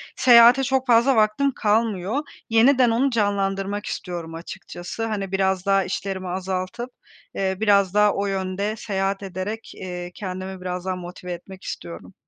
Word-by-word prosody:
Seyahate 240 +1 +7
çok 265 0 0
fazla 245 +3 +5
vaktim 220 +6 +3
kalmıyor. 215 0 0 0.3
Yeniden 245 +2 +5
onu 245 +5 +2
canlandırmak 200 -2 -1
istiyorum 170 -3 -5
açıkçası. 175 +4 -6
Hani, 200 -4 -3
biraz 190 -1 0
daha 195 -1 +3
işlerimi 190 0 -4
azaltıp, 185 +6 -3 0.5
eee, 190 -1 -1
biraz 200 -3 +3
daha 210 0 +4
o 200 - -1
yönde 195 +2 -2
seyahat 195 -2 -2
ederek, 195 +4 -5
eee, 180 -1 -6
kendimi 185 -1 -6
biraz 180 0 -4
daha 185 -1 -1
motive 180 0 -8
etmek 185 +2 -11
istiyorum. 85 +2 -8
195 Hz, 140 wpm, -23 LUFS, 185-220 Hz, 0.5 s, Seyahate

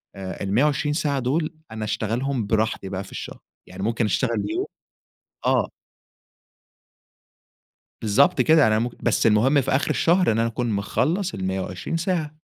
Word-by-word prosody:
آآ 95 -1 -6
ال120 145 +9 +1
ساعة 145 -3 0
دول 155 +6 -1 0.2
أنا 110 -1 -4
أشتغلهم 115 +4 -1
براحتي 110 -3 0
بقى 95 0 -4
في - - -14
الشهر، - - -7 0.3
يعني 95 +1 -7
ممكن 115 +2 0
أشتغل 110 0 0
يوم - - -1 0.8
آه - - +2 2.3
بالضبط 125 +5 +3
كده، 155 +2 +5
أنا 110 0 +3
مم 120 +2 -1
بس - - +2
المهم 130 +7 +4
في - - -3
آخِر 135 +3 +1
الشهر 175 -1 +3
إن 110 - 0
أنا 115 - +2
أكون 120 +1 -2
مخلّص 155 - 0
ال120 95 - -3
ساعة. 160 -3 -2
120 Hz, 145 wpm, -23 LUFS, 105-150 Hz, 2.3 s, كده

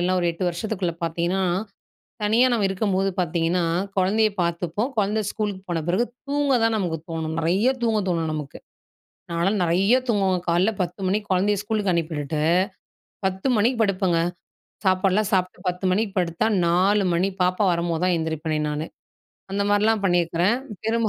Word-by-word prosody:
இல்ல 185 +1 +2
ஒரு 175 - 0
8 175 +3 -4
வருஷத்துக்குள்ள 180 -1 -2
பார்த்திங்கன்னா, 170 +3 -1 0.8
தனியா 225 +5 +4
நம்ம 220 -4 +2
இருக்கும்போது 195 0 0
பார்த்தீங்கன்னா, 170 +1 0 0.3
கொழந்தைய 215 +4 +3
பார்த்துப்போம் 175 - -1
கொழந்த 210 +1 +1
ஸ்கூலுக்கு 205 -3 -3
போன 165 -2 -1
பிறகு 185 +7 +2 0.2
தூங்க 285 -1 +1
தான் 225 0 +2
நமக்கு 175 -5 -1
தோணும். 160 -1 -3
நெறைய 185 +9 +2
தூங்க 225 -2 +2
தோணும் 165 -2 0
நமக்கு. 150 -2 -6 0.7
நான்லாம் 190 +5 +1
நெறையா 190 +8 +3
தூங்குவ 195 -4 +2
காலையில 175 +5 +3
10 180 +2 -5
மணிக்கு 205 +2 -1
கொழந்தைய 200 +2 +2
ஸ்கூலுக்கு 205 -3 0
அனுப்பிவிட்டுட்டு 155 -2 -2 0.8
10 190 +6 -1
மணிக்கு 230 +4 +2
படுப்பங்க, 190 -4 +1 0.7
சாப்பாடுலாம் 190 +2 +2
சாப்பிட்டு 185 -1 0
10 180 +1 -2
மணிக்கு 200 0 0
படுத்தா 175 +2 0 0.2
4 190 +4 +3
மணி 185 +3 +1
பாப்பா 185 +3 +1
வரும்போது 170 -1 -1
தான் 185 -1 +3
எழுந்திரிப்பேனே 160 -1 -2
நானு. 150 +1 -3 0.7
அந்த 200 - 0
மாரிலாம் 210 +1 +2
பண்ணியிருக்கிறேன். 175 +3 +2 0.3
பெரும்பாலும் 225 0 +1
185 Hz, 145 wpm, -23 LUFS, 170-210 Hz, 0.8 s, தனியா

